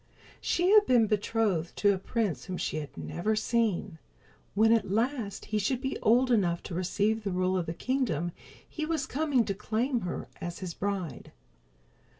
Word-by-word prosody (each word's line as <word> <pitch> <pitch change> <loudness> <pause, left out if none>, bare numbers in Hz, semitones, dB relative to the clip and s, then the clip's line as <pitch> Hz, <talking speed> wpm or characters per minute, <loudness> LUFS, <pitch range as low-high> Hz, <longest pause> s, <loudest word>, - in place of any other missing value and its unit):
She 355 +2 +2
had 425 -1 +7
been 240 -3 +5
betrothed 205 -5 0
to 205 -1 +4
a 190 - -3
prince 190 - -2
whom 185 - -4
she - - -2
had 150 -2 -6
never 215 +6 -1
seen. 215 -6 0 0.6
When 220 +2 +5
at 215 -4 +1
last 225 0 -1
he 215 0 -1
should 240 +5 0
be 265 +1 -3
old 250 +3 +4
enough 175 -7 +2
to - - -7
receive 205 +5 0
the 200 - -1
rule 185 +1 +1
of 180 -3 -1
the 165 - -3
kingdom 190 - -1 0.4
he 315 - -5
was 310 -3 -1
coming 280 -5 +1
to 200 - -1
claim 235 +6 -1
her 175 - -4
as 175 0 -5
his 180 -3 -5
bride. 195 -5 -4
210 Hz, 175 wpm, -29 LUFS, 185-245 Hz, 0.6 s, had